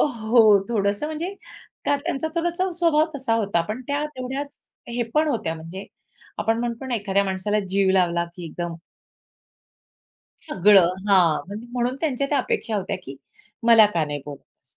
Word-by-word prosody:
अ, -, -, +5 dB
हो, 225 Hz, -5 st, +4 dB
थोडंसं 205 Hz, +3 st, 0 dB
म्हणजे 330 Hz, +5 st, -4 dB, 0.5 s
त्या 285 Hz, -, +2 dB
त्यांचा 315 Hz, 0 st, -3 dB
थोडासा 345 Hz, +2 st, 0 dB
स्वभाव 320 Hz, -2 st, +3 dB
तसा 260 Hz, -5 st, -1 dB
होता, 200 Hz, -6 st, +1 dB
पण 220 Hz, +4 st, -4 dB
त्या 285 Hz, +1 st, 0 dB
तेवढ्याच 265 Hz, +3 st, -6 dB, 0.2 s
हे 240 Hz, 0 st, -1 dB
पण 305 Hz, +1 st, +3 dB
होत्या 220 Hz, -, -1 dB
म्हणजे 165 Hz, +5 st, -8 dB, 0.5 s
आपण 225 Hz, +1 st, +1 dB
म्हणतो 240 Hz, +2 st, -4 dB
ना, 250 Hz, -, -1 dB
एखाद्या 200 Hz, -2 st, +1 dB
माणसाला 195 Hz, +2 st, -1 dB
जीव 195 Hz, 0 st, +2 dB
लावला 175 Hz, -2 st, +2 dB
की 175 Hz, -, -8 dB
एकदम 170 Hz, +1 st, -5 dB, 1.7 s
सगळं. 190 Hz, -1 st, +5 dB, 0.2 s
हां, 180 Hz, -5 st, +5 dB
म्हणजे 210 Hz, +4 st, -8 dB
म्हणून 250 Hz, +1 st, 0 dB
त्यांच्या 280 Hz, -4 st, 0 dB
त्या 290 Hz, -, +3 dB
अपेक्षा 230 Hz, -3 st, -1 dB
होत्या 195 Hz, -, -2 dB
की 135 Hz, +1 st, -8 dB, 0.5 s
मला 225 Hz, -2 st, +8 dB
का 165 Hz, -, +2 dB
नाही 145 Hz, -1 st, -5 dB
बोलवलंस. 145 Hz, -2 st, -12 dB
225 Hz, 160 wpm, -23 LUFS, 190-275 Hz, 1.7 s, मला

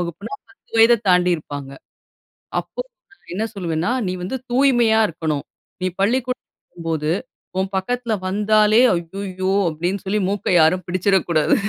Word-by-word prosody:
வகுப்புனா 175 Hz, -, -5 dB, 0.2 s
10 395 Hz, -, -27 dB
வயத 230 Hz, 0 st, +6 dB
தாண்டியிருப்பாங்க. 165 Hz, -6 st, +1 dB, 0.9 s
அப்போ -, -, -6 dB, 0.3 s
நான் 400 Hz, -, -19 dB
என்ன 215 Hz, -, -1 dB
சொல்வேன்னா, 170 Hz, 0 st, -1 dB, 0.2 s
நீ -, -, -1 dB
வந்து 265 Hz, +8 st, -3 dB, 0.2 s
தூய்மையா 240 Hz, -4 st, +4 dB
இருக்கனும். 155 Hz, -3 st, -3 dB, 0.4 s
நீ 185 Hz, -, +1 dB
பள்ளிக்கூடத்துல 250 Hz, +5 st, 0 dB
இருக்கும்போது 160 Hz, -2 st, -3 dB, 0.5 s
உன் 190 Hz, 0 st, 0 dB
பக்கத்துல 240 Hz, +4 st, -2 dB
வந்தாலே 210 Hz, +2 st, +3 dB, 0.2 s
"ஐய்யய்யோ!" 185 Hz, +2 st, -4 dB, 0.2 s
அப்டீன்னு 175 Hz, +5 st, -2 dB
சொல்லி 200 Hz, +2 st, 0 dB
மூக்க 205 Hz, 0 st, -3 dB
யாரும் 160 Hz, +4 st, +4 dB
பிடிச்சிரக்கூடாது. 180 Hz, -3 st, +2 dB
190 Hz, 125 wpm, -21 LUFS, 170-220 Hz, 0.9 s, வயத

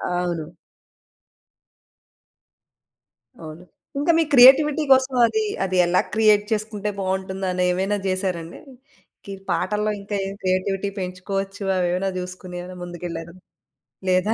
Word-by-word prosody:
అవును. 175 Hz, -2 st, -3 dB, 2.9 s
అవును. 160 Hz, +2 st, -10 dB, 0.4 s
ఇంకా 325 Hz, +4 st, +3 dB
మీ 330 Hz, -, +4 dB
క్రియేటివిటీ 280 Hz, +4 st, +7 dB
కోసం, 260 Hz, 0 st, +4 dB
అదీ, 440 Hz, -, -1 dB, 0.2 s
అది 185 Hz, -1 st, -2 dB
ఎలా 180 Hz, +1 st, +3 dB
క్రియేట్ 215 Hz, -1 st, +4 dB
చేసుకుంటే 210 Hz, -1 st, -2 dB
బావుంటుందనేమైనా 190 Hz, 0 st, -1 dB
జేసారా 185 Hz, -2 st, -1 dB
అండి? 165 Hz, -, -11 dB, 0.7 s
గీ 200 Hz, -, -7 dB, 0.2 s
పాటల్లో 210 Hz, +4 st, 0 dB
ఇంకా 205 Hz, +1 st, -5 dB
ఏం 195 Hz, -, -5 dB
క్రియేటివిటీ 190 Hz, +2 st, 0 dB
పెంచుకోవచ్చు, 195 Hz, +2 st, -4 dB
అవేమైనా 180 Hz, +2 st, 0 dB
జూసుకొనేమన్నా 180 Hz, 0 st, -8 dB
ముందుకెళ్ళారా? 170 Hz, -1 st, -7 dB, 0.7 s
లేదా? 185 Hz, +4 st, +2 dB
190 Hz, 100 wpm, -22 LUFS, 180-210 Hz, 2.9 s, క్రియేటివిటీ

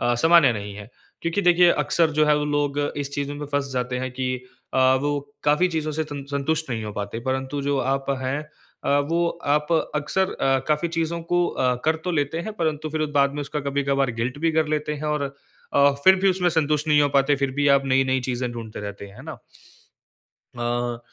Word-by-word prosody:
अ, 120 Hz, -, +2 dB
सामान्य 160 Hz, -1 st, +5 dB
नहीं 105 Hz, -2 st, -6 dB
है। 105 Hz, +2 st, -10 dB, 0.3 s
क्योंकि 170 Hz, +4 st, 0 dB
देखिए 175 Hz, -1 st, +6 dB
अक्सर 165 Hz, -2 st, +2 dB
जो 155 Hz, 0 st, +3 dB
है 150 Hz, -, +5 dB
वो 150 Hz, -, 0 dB
लोग 145 Hz, -1 st, 0 dB, 0.2 s
इस 140 Hz, -1 st, -3 dB
चीज़ 145 Hz, 0 st, -2 dB
में 145 Hz, 0 st, -5 dB
फँस 140 Hz, -1 st, 0 dB
जाते 125 Hz, 0 st, -2 dB
हैं 130 Hz, 0 st, -3 dB
कि 130 Hz, 0 st, -2 dB, 0.4 s
अ, -, -, +2 dB, 0.2 s
वो 145 Hz, 0 st, 0 dB, 0.2 s
काफ़ी 150 Hz, +5 st, +3 dB
चीज़ों 155 Hz, -2 st, -2 dB
से 160 Hz, +2 st, -1 dB
सं 145 Hz, -2 st, -7 dB
संतुष्ट 145 Hz, +1 st, -1 dB
नहीं 115 Hz, -2 st, -3 dB
हो 105 Hz, -, -5 dB
पाते 105 Hz, +3 st, -5 dB
परंतु 130 Hz, +2 st, -2 dB
जो 140 Hz, 0 st, 0 dB
आप 135 Hz, 0 st, -2 dB
हैं 130 Hz, +3 st, -1 dB, 0.4 s
अ, 140 Hz, -, +3 dB
वो 170 Hz, +1 st, +2 dB, 0.3 s
आप 150 Hz, +2 st, 0 dB, 0.2 s
अक्सर 155 Hz, +6 st, 0 dB
अ, 135 Hz, 0 st, +2 dB
काफ़ी 150 Hz, +2 st, +1 dB
चीज़ों 165 Hz, +1 st, -1 dB
को 175 Hz, 0 st, +3 dB
अ, 125 Hz, -1 st, 0 dB
कर 160 Hz, +1 st, +2 dB
तो 180 Hz, -, -1 dB
लेते 145 Hz, +1 st, 0 dB
हैं -, -, -4 dB
परंतु 155 Hz, -3 st, -1 dB
फिर 155 Hz, 0 st, -1 dB
बाद 140 Hz, 0 st, +3 dB
में 145 Hz, -, -3 dB
उसका 145 Hz, +1 st, -4 dB
कभी-कभार 140 Hz, -1 st, +1 dB
गिल्ट 125 Hz, +4 st, -2 dB
भी 165 Hz, -, +2 dB
कर 160 Hz, 0 st, +2 dB
लेते 150 Hz, 0 st, -2 dB
हैं 150 Hz, +1 st, -7 dB
और 150 Hz, -, -2 dB, 0.5 s
अ, 140 Hz, 0 st, +5 dB
फिर 190 Hz, 0 st, +8 dB
भी 195 Hz, -, +6 dB
उसमें 180 Hz, -1 st, +1 dB
संतुष्ट 155 Hz, -1 st, 0 dB
नहीं 150 Hz, -1 st, +5 dB
हो 145 Hz, -, +3 dB
पाते। 140 Hz, +1 st, +3 dB
फिर 140 Hz, -1 st, -1 dB
भी 145 Hz, -, +4 dB
आप 135 Hz, -, -2 dB
नई-नई 130 Hz, 0 st, +2 dB
चीज़ें 125 Hz, 0 st, -2 dB
ढूंढते 115 Hz, -3 st, -7 dB
रहते 100 Hz, 0 st, -7 dB
हैं, 100 Hz, -, -15 dB
है -, -, -11 dB
ना? -, -, -8 dB, 1.2 s
अ, 120 Hz, 0 st, -2 dB
145 Hz, 215 wpm, -23 LUFS, 130-155 Hz, 1.2 s, फिर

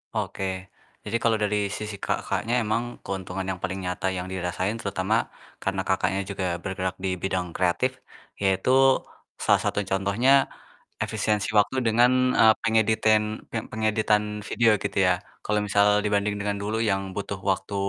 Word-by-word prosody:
Oke, 95 Hz, -1 st, -3 dB, 0.3 s
jadi 110 Hz, +2 st, -1 dB
kalau 115 Hz, -1 st, +3 dB
dari 105 Hz, -1 st, +1 dB
sisi 105 Hz, 0 st, -5 dB
Kakaknya 115 Hz, +2 st, -2 dB
emang 110 Hz, +2 st, 0 dB, 0.2 s
keuntungan 95 Hz, -1 st, -4 dB
yang 95 Hz, -1 st, -4 dB
paling 95 Hz, 0 st, -3 dB
nyata 90 Hz, +1 st, -2 dB
yang 95 Hz, 0 st, -3 dB
dirasain 95 Hz, +4 st, -2 dB
terutama, 100 Hz, +3 st, 0 dB, 0.3 s
karena -, -, -2 dB
Kakaknya 95 Hz, +1 st, 0 dB
juga 95 Hz, -3 st, -2 dB
bergerak 95 Hz, -1 st, -3 dB
dibidang 95 Hz, -1 st, -2 dB
kreatif, 90 Hz, +10 st, +1 dB, 0.5 s
yaitu, 95 Hz, +4 st, +1 dB, 0.7 s
salah -, -, +4 dB
satu 105 Hz, -, 0 dB
contohnya, 100 Hz, +9 st, +3 dB, 0.6 s
efisiensi 105 Hz, -1 st, -1 dB
waktu 130 Hz, +6 st, +1 dB
dengan, 120 Hz, +3 st, +5 dB, 0.3 s
eee, 110 Hz, -1 st, +8 dB
pengeditin 110 Hz, -1 st, +3 dB, 0.3 s
pe 115 Hz, -, -2 dB
pengeditan 110 Hz, -1 st, +1 dB, 0.2 s
video 115 Hz, -1 st, +3 dB
gitu -, -, -3 dB
ya, 90 Hz, -, +5 dB, 0.3 s
kalau 105 Hz, 0 st, +1 dB
misal 105 Hz, +1 st, +4 dB
dibanding 105 Hz, 0 st, +1 dB
dengan 100 Hz, 0 st, -1 dB
dulu 110 Hz, +2 st, -1 dB
yang 100 Hz, -4 st, +1 dB
butuh 100 Hz, -1 st, -4 dB
waktu, 100 Hz, +1 st, -3 dB
100 Hz, 140 wpm, -25 LUFS, 95-110 Hz, 0.7 s, eee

